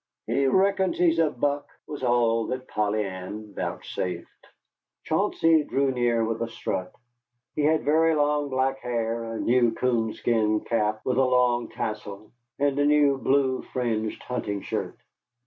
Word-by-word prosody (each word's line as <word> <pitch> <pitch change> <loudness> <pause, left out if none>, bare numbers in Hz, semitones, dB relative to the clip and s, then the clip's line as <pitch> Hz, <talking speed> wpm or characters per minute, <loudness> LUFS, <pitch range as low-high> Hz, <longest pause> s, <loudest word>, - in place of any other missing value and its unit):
"He 135 0 +1
reckons 190 +4 +2
he's 165 -2 +3
a 160 -2 +4
buck," 145 +2 -1 0.2
was 145 - -7
all 120 -2 +2
that 130 0 -4
Polly 105 0 0
Ann 100 +3 -7
vouchsafed. 90 -2 -5 0.6
Chauncey 165 -2 +2
drew 140 -1 0
near 120 -2 +1
with 115 0 -3
a 115 - -1
strut. 90 -4 -4 0.6
He - - 0
had 155 +2 +2
very 160 +2 +3
long 145 -1 +1
black 135 0 0
hair, 115 -2 -2
a 115 0 -5
new 120 -1 +3
coonskin 110 -2 +1
cap 110 -2 -1
with 125 - 0
a - - +5
long 125 -1 +2
tassel, 105 -1 -6 0.3
and 145 0 +1
a 145 - +3
new 145 -2 +4
blue 130 -1 +1
fringed 110 -4 -3
hunting 105 -5 -3
shirt. - - -4
125 Hz, 145 wpm, -26 LUFS, 110-145 Hz, 0.6 s, a